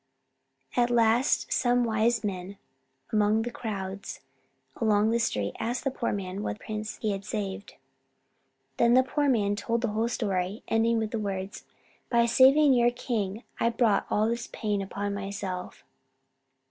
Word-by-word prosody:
At 240 0 +3
last 235 +2 +2
some 245 0 +2
wise 225 0 +1
men 195 -1 -4 0.6
among 215 +1 +3
the 240 - -4
crowds 200 -4 -5 0.6
along 215 -1 +2
the 235 - +2
street 105 - -1
asked 240 +2 -2
the 270 - 0
poor 250 -2 -2
man 195 -1 -4
what 210 - -3
prince 215 0 -5
he 215 - -1
had 195 0 -4
saved. 200 -1 -5 1.0
Then 235 +1 +4
the 260 - +6
poor 285 +2 0
man 205 -5 +2
told 230 +3 -1
the 235 - 0
whole 220 +2 0
story, 195 -3 -2
ending 230 +1 +2
with 220 -1 -2
the 230 - -2
words, 195 -2 -4 0.4
"By 235 -1 +4
saving 265 +4 +6
your 240 -1 +4
king, 230 -4 -3 0.2
I 230 - +3
brought 230 -2 +2
all 215 +1 +2
this 235 +1 -2
pain 210 -2 -2
upon 200 +1 -3
myself." 195 -2 -5
220 Hz, 155 wpm, -27 LUFS, 200-235 Hz, 1.0 s, the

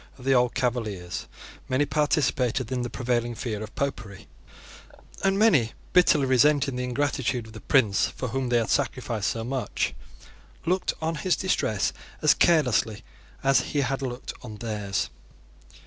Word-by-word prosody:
Of 125 - -13
the 135 - +4
old 125 -1 +3
Cavaliers 110 -8 -2 0.4
many 130 +3 +2
participated 135 -5 +1
in 125 -1 -1
the 120 - -3
prevailing 120 -1 -1
fear 110 -3 -4
of 110 0 -8
Popery, 110 -8 -4 1.0
and 195 0 +3
many, 160 - +4 0.2
bitterly 165 -6 +5
resenting 135 +1 +3
the 125 - -2
ingratitude 125 -2 -1
of 110 - -13
the 110 - -9
prince 110 -8 +3
for 125 - -5
whom 130 +1 -2
they 120 - +3
had 115 -1 0
sacrificed 120 -6 0
so 115 - -3
much, 130 +2 -2 0.7
looked 180 +2 +1
on 160 +1 0
his 180 +4 +1
distress 110 - 0 0.3
as - - +5
carelessly 125 -9 +2 0.4
as 135 0 +5
he 145 - -1
had 135 +1 -1
looked 125 -1 -5
on 110 -4 -8
theirs. 105 -3 -3
125 Hz, 150 wpm, -26 LUFS, 115-140 Hz, 1.0 s, bitterly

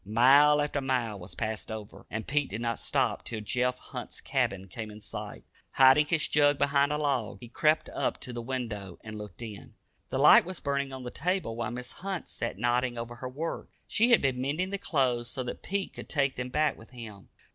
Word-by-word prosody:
Mile 135 +8 +6
after 145 -1 -1
mile 125 -6 -1
was 90 +2 -9
passed 110 0 -3
over, 110 -2 -8
yet 110 0 -4
Pete 145 -1 +1
did 105 - -4
not 115 -1 -1
stop - - 0
till 110 - -4
Jeff 125 +4 0
Hunt's - - -8
cabin 95 0 -1
came 110 +4 -6
in 105 0 -10
sight. 105 - -7 0.3
Hiding 135 +3 +6
his 160 -2 +2
jug 145 -1 +4
behind 140 0 +3
a 150 - +1
log, 140 -7 0
he 120 - -10
crept 155 +6 +2
up - - -1
to 125 - -6
the 120 - -4
window 115 -7 -4
and 110 -1 -7
looked 105 +2 -8
in. 105 -3 -9 0.3
The - - -2
light - - +8
was 185 -1 -5
burning 140 -1 -1
on 130 -1 -6
the 125 - -5
table, 180 -7 -1
while 115 -1 -2
Mrs. 125 +1 -6
Hunt 190 -1 -4
sat 115 -5 -4
nodding 120 +2 +1
over 120 +1 -6
her 130 - -5
work. 155 +6 -4 0.2
She 230 +3 +3
had 235 - +6
been 130 -2 +1
mending 155 +8 -1
the 200 - -2
clothes 125 -9 +1
so 130 0 -3
that 125 - -6
Pete 195 0 -2
could - - -9
take 140 -3 +1
them 125 0 -4
back 150 +4 +1
with 110 - -14
him. 115 -5 -10
125 Hz, 215 wpm, -29 LUFS, 115-145 Hz, 0.3 s, light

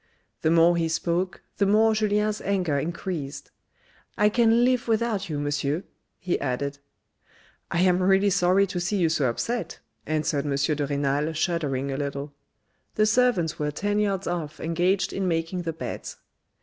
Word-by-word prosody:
The 160 - +2
more 170 +1 +5
he 165 -1 0
spoke 175 +3 -1
the 200 - +2
more 220 +2 +4
Julien's 210 0 0
anger 180 -7 0
increased, 160 -2 -5 0.3
" - - -33
I 210 - +4
can 235 +1 +4
live 250 -1 +1
without 220 -4 0
you, 150 - -2
Monsieur," 145 +3 -1 0.3
he 180 -1 -2
added. 140 +1 -3 0.5
" - - -31
I 170 - +1
am 180 0 +3
really 195 +2 +3
sorry 185 +1 +3
to 180 -2 -4
see 185 +4 -1
you 170 -4 +2
so 145 -5 +1
upset," 210 - -3 0.3
answered 150 -2 0
M. 140 - 0
de 145 +1 0
Renal 145 +2 0
shuddering 150 -5 -1
a 135 - -3
little. 140 0 -4 0.6
The 215 - +3
servants 215 -8 +2
were 150 0 0
ten 205 +7 -1
yards 195 -2 0
off 165 -4 -4
engaged 175 +4 0
in 195 -1 -1
making 165 +1 -1
the 165 -2 -3
beds. 160 - -6
175 Hz, 165 wpm, -25 LUFS, 150-200 Hz, 0.6 s, more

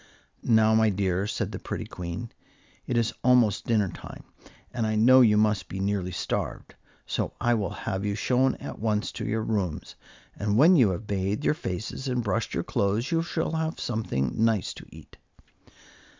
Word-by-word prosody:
"Now, 110 -1 +4
my 110 0 +4
dears," 95 0 -1
said - - -3
the - - -6
pretty - - -5
Queen, 90 +6 -6 0.6
"it 120 - 0
is 115 -1 +1
almost 125 -5 +3
dinner 105 -5 +2
time, - - -10 0.5
and 115 -2 -1
I 110 - 0
know 130 +4 +6
you 105 -4 +5
must 105 -2 +2
be 95 - -5
nearly 100 -2 -1
starved; - - -4 0.3
so - - -2
I 120 - +2
will 105 -6 0 0.2
have 95 0 -2
you 100 0 -1
shown 130 +4 +2
at - - -8
once 105 -1 -1
to - - -6
your 110 0 -1
rooms, 100 -8 -2 0.4
and 105 0 0
when 165 +8 +7
you 125 - +5
have 95 +4 -4
bathed 100 +6 -2
your - - +4
faces 110 - -5
and 125 -2 -1
brushed 100 -4 -2
your - - -1
clothes 105 +6 -1
you 165 -1 +2
shall 165 -1 -2
have 160 0 -2
something 85 - -2
nice 110 -4 +1
to - - -12
eat." - - -15
110 Hz, 180 wpm, -26 LUFS, 100-120 Hz, 0.6 s, when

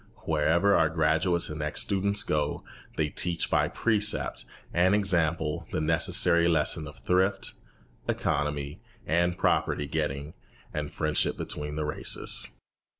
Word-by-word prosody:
Wherever 80 +6 +3
our 80 -1 +3
graduates 80 +2 +2
and 75 0 -5
ex 75 0 0
students 100 +1 +1
go, 75 -7 -1 0.3
they 75 -1 +1
teach 85 +3 -2
by - - +3
precept 105 -2 +1 0.3
and 90 +3 +4
example 85 -6 0
the - - -1
necessary 85 +2 +3
lesson 80 -1 +1
of 75 - -11
thrift, 95 +2 +1 0.6
economy, 75 +3 -2 0.2
and 85 +2 +1
property 75 - +1
getting, 75 0 -3 0.4
and 75 -1 -3
friendship 75 -1 0
between 75 0 -4
the 75 0 -2
races. 75 - 0
80 Hz, 125 wpm, -28 LUFS, 75-90 Hz, 0.6 s, and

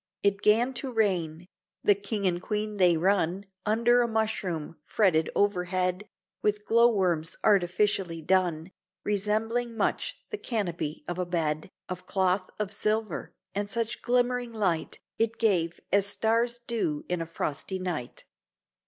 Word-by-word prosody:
It 200 0 +2
'gan 235 +5 +4
to 265 - -4
rain, 180 -7 0 0.4
the 205 - +6
King 200 +1 -3
and 175 -1 +1
Queen 210 +1 -2
they 180 -3 +5
run 185 +1 +1 0.2
Under 235 +3 +4
a 240 - +2
mushroom, 200 -8 -2
fretted 160 -6 +2
overhead, 185 0 0 0.3
With 210 0 0
glow 235 +1 +5
worms 175 -6 0
artificially 190 -3 +2
done, 175 -1 +1 0.3
Resembling 220 +3 0
much - - 0
the 425 - -3
canopy 175 -9 -3
of 175 +1 -3
a 180 - 0
bed 155 -2 -1 0.2
Of 185 0 -6
cloth 185 -1 +1
of 210 -2 -2
silver: 215 -2 -1 0.2
and 205 +1 -2
such 230 +1 -2
glimmering 245 0 +1
light 190 -8 -1 0.2
It 225 0 +1
gave, 175 -7 +1
as 200 +1 +4
stars 230 +3 +1
do 185 -11 -1
in 180 -1 -1
a 165 - -4
frosty 160 +3 -3
night. 175 -9 -5
200 Hz, 140 wpm, -28 LUFS, 175-220 Hz, 0.4 s, the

